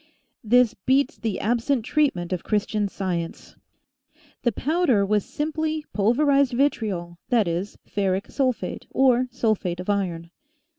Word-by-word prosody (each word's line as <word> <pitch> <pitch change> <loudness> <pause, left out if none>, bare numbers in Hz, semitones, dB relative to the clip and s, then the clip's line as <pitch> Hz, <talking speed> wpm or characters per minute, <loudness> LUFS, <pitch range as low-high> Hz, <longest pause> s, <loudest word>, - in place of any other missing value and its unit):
This 240 +1 +4
beats 265 +6 +1
the 225 -5 -2
absent 240 +2 0
treatment 190 - +1
of 180 - -3
Christian 210 -1 0
Science! 180 -4 -4 0.9
The 240 - +2
powder 270 - +2
was 210 0 +1
simply 310 0 -2
pulverized 275 +5 +3
vitriol, 205 -10 -1
that 230 -6 +3
is, 175 +4 -3
ferric 195 0 -1
sulphate, 255 -4 -2
or 255 -1 +3
sulphate 215 -8 -1
of 185 +3 -1
iron. 170 -4 -2
220 Hz, 120 wpm, -24 LUFS, 190-265 Hz, 0.9 s, This